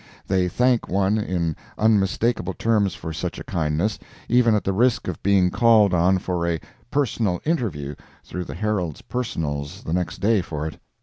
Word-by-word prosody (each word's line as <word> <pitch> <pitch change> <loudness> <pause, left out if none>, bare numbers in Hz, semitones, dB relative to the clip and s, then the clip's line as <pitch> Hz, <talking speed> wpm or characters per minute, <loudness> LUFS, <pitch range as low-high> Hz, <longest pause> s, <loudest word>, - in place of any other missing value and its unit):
They 95 -1 +2
thank 125 +4 +2
one 100 +3 +2
in 85 -6 -1 0.2
unmistakable 105 -2 +1
terms 105 -3 +1
for 80 - -6
such 80 - -4
a - - -6
kindness, 80 +6 -1 0.3
even 120 -2 +4
at 105 - 0
the 95 - 0
risk 115 +2 +2
of 90 - -4
being 95 -2 +3
called 110 -3 +5
on 90 +2 +4
for 90 -2 -2
a 85 -1 0 0.3
"personal 115 -10 0
interview" 95 - -1 0.3
through 90 0 -5
the - - -7
Herald's 100 -8 -2
"Personals" 75 -12 -3
the 80 - -3
next 85 -3 -1
day 105 0 +2
for 75 -3 -5
it. 80 - -6
95 Hz, 170 wpm, -23 LUFS, 85-110 Hz, 0.3 s, called